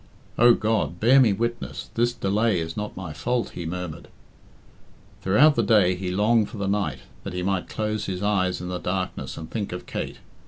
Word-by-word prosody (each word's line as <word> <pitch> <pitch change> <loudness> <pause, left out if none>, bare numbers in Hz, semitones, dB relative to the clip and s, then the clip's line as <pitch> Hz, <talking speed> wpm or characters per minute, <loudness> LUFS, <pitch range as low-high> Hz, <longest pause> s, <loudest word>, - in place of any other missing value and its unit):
"Oh 120 0 +6
God, 100 -7 -1
bear 125 +5 +6
me 120 -5 +5
witness, 115 +4 -3
this 120 +1 +2
delay 105 -2 +1
is 80 0 -4
not 105 0 -5
my 90 -5 -6
fault," 120 - -1
he 85 - -6
murmured. 85 -2 -5 1.1
Throughout 130 +11 +5
the 120 - +1
day 100 -4 +4
he 90 0 -4
longed 105 +3 +2
for 115 - -9
the 100 -1 -2
night, 100 0 -1 0.2
that - - -6
he 90 0 -3
might 95 -1 -1
close 110 -1 -2
his 95 0 -3
eyes 95 -4 +1
in 90 - -5
the 90 0 -3
darkness 90 -8 -3
and 80 - -7
think 105 -3 -3
of 90 - -6
Kate. - - -5
100 Hz, 195 wpm, -25 LUFS, 90-110 Hz, 1.1 s, Oh